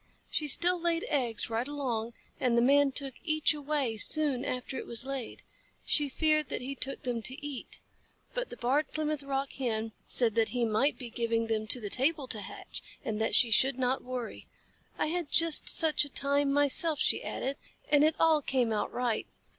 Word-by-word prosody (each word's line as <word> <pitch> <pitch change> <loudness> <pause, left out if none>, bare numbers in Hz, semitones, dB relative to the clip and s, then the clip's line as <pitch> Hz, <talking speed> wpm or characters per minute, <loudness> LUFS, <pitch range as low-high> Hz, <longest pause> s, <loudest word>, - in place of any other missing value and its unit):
She 300 - 0
still 350 +5 +4
laid 335 -1 0
eggs 240 -7 -1
right 230 +3 -1
along, 240 -6 -3 0.3
and 240 -2 +2
the - - +5
Man 280 +2 +4
took 270 0 -1
each 310 -2 +2
away 290 -6 -2
soon 280 +2 +2
after 255 +1 -4
it - - -5
was 235 +1 -3
laid. 270 -3 -5 0.4
She 295 -2 +2
feared 305 0 +1
that - - -2
he 265 +2 -4
took 275 0 -4
them 245 -2 -2
to 265 +6 -4
eat, 285 -4 -6 0.5
but - - -3
the - - -9
Barred 270 +5 0
Plymouth 305 -1 -2
Rock 275 0 -2
Hen 225 -4 -2 0.2
said 235 -3 +2
that 225 0 +2
he 245 -1 0
might 225 +6 +1
be 245 -3 -7
giving 230 -1 0
them 220 -1 -2
to 250 - +2
the 205 -3 -6
table 280 +1 0
to 215 - -2
hatch, - - -8 0.2
and 220 0 -2
that 220 - +1
she 235 - +4
should 260 +4 +3
not 255 0 0
worry. 250 -2 -6 0.5
"I - - +1
had 335 0 -2
just 330 -2 +4
such 320 -3 +3
a 290 - -4
time 280 +1 +1
myself," 290 +3 +3
she - - +1
added, 275 +1 -3 0.3
"and 295 -1 +6
it 310 +1 +3
all 320 -2 +4
came 250 -5 +1
out 210 - -1
right. 245 -3 -1
270 Hz, 195 wpm, -30 LUFS, 235-295 Hz, 0.5 s, and